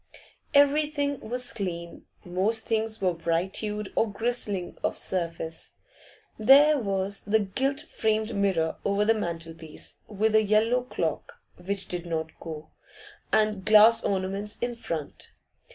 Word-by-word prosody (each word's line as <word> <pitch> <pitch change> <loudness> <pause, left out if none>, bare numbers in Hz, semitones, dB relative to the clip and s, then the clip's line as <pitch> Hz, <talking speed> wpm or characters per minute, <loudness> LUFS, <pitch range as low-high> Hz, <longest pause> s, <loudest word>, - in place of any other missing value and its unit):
Everything 285 0 +3
was 250 +3 -2
clean; 170 -6 -5 0.2
most 195 +5 -1
things 220 -1 -1
were 185 -2 +2
bright 170 +3 0
hued 210 -1 -2
or 225 - +1
glistening 205 -4 -2
of - - -1
surface. 165 -2 -2 0.7
There 285 +6 +7
was 195 -2 -1
the 210 +2 +2
gilt 265 +7 -1
framed 220 0 -1
mirror 190 -5 +1
over 200 +1 +1
the 225 - +5
mantelpiece, 165 -5 -6
with 215 +1 0
a 220 - +6
yellow 215 +4 +2
clock 255 - -3 0.2
which 195 +2 -4
did 175 -1 -4
not 160 -1 -2
go 155 -2 -8 0.6
and 215 -3 +2
glass 220 +3 +6
ornaments 195 +2 -2
in 240 0 -2
front. 165 -10 -6
210 Hz, 130 wpm, -27 LUFS, 180-225 Hz, 0.7 s, There